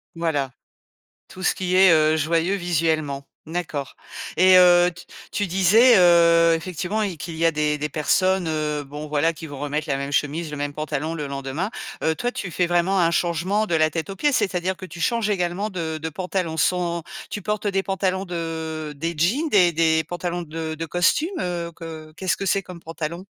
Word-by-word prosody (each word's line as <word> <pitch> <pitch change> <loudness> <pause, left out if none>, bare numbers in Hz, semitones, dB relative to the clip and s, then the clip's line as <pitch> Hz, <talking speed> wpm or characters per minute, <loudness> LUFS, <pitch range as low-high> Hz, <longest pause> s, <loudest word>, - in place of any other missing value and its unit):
Voilà. 150 -5 -1 0.8
Tout 185 - -11
ce - - +3
qui 185 -1 -1
est, 190 -1 +7
heu, 155 0 +4
joyeux 165 +4 +1
visuellement. 160 -5 -1 0.2
D'accord. 160 -4 -4 0.4
Et 185 +2 +6
heu, 175 0 +6
t 180 +1 -13 0.3
tu 205 - 0
disais, 195 +7 +5
heu, 170 -2 +6
effectivement 180 +5 -3
il 195 -5 -2
qu'il 160 +2 -7
y 165 +1 +2
a - - +5
des 150 -1 0
des 150 - -2
personnes, 185 +5 +1
heu, 150 -2 -2
bon 145 +2 -7
voilà, 150 +2 +1
qui 160 0 -9
vont 145 -2 -8
remettre 145 +2 -3
la 135 - +1
même 140 +1 -4
chemise, 150 +3 -1
le 150 - -6
même 145 0 -3
pantalon 155 +1 -3
le 150 -3 -4
lendemain. 140 +7 -4 0.3
Heu, 160 - +2
toi, 245 +9 -2
tu 190 - -5
fais 180 +1 0
vraiment 175 +2 +2
un 165 -1 +3
changement 175 +5 0
de 175 - -1
la 155 0 +3
tête 165 +4 -4
aux 195 - -6
pieds, 295 +7 +1
c'est-à-dire 190 -6 0
que 190 - -10
tu 170 -1 -10
changes 230 +2 +1
également 190 +2 -1
de 165 -4 -4
de 160 +1 -4
pantalon 180 -1 -3
sans 170 0 0 0.3
tu 205 - -4
portes 210 +2 -2
des 195 -1 +1
pantalons 190 0 -1
de 160 -3 -4
des 165 +4 -3
jeans, 225 - +1
des 185 - +4
des 160 0 +2
pantalons 175 +1 -4
de 160 0 -5
de 165 +1 -5
costumes, 300 - +1
heu, 170 -1 -3
que 160 -2 -9
qu'est-ce 190 -1 0
que - - -4
c'est 195 +2 +1
comme 180 -2 -11
pantalon? 165 +2 -6
170 Hz, 200 wpm, -23 LUFS, 155-185 Hz, 0.8 s, est